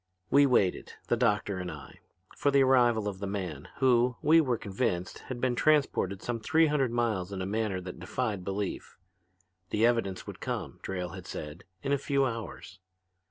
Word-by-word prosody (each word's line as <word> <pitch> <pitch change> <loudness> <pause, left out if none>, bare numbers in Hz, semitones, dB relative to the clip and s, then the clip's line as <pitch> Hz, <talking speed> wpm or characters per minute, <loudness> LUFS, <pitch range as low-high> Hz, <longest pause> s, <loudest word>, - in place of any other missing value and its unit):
"We 140 0 +6
waited, 100 -8 +1 0.2
the - - +4
doctor 105 -5 +1
and 90 -1 -4
I, - - -11 0.4
for 145 - +1
the 140 -1 +5
arrival 120 -5 +4
of 95 -2 -4
the 100 - -3
man 90 -8 -4
who, 125 -2 +3
we 165 +2 +6
were 125 -6 0
convinced, 95 -4 -2
had 130 -2 -4
been 125 0 +1
transported 120 -9 +2
some 120 -1 -2
three 160 +8 +3
hundred 145 -4 +1
miles 110 -6 0
in 95 - -4
a 95 - -2
manner 105 -1 -1
that 90 -1 -8
defied 100 +1 -2
belief. 100 +1 -4 0.7
The 110 +2 +2
evidence 115 -6 0
would - - -8
come, - - -4
Drayle 90 -2 -4
had 95 -1 -9
said, 75 +3 -7 0.2
in 140 - -1
a 140 - +2
few 140 0 +1
hours. 115 -5 -6
110 Hz, 180 wpm, -29 LUFS, 95-130 Hz, 0.7 s, We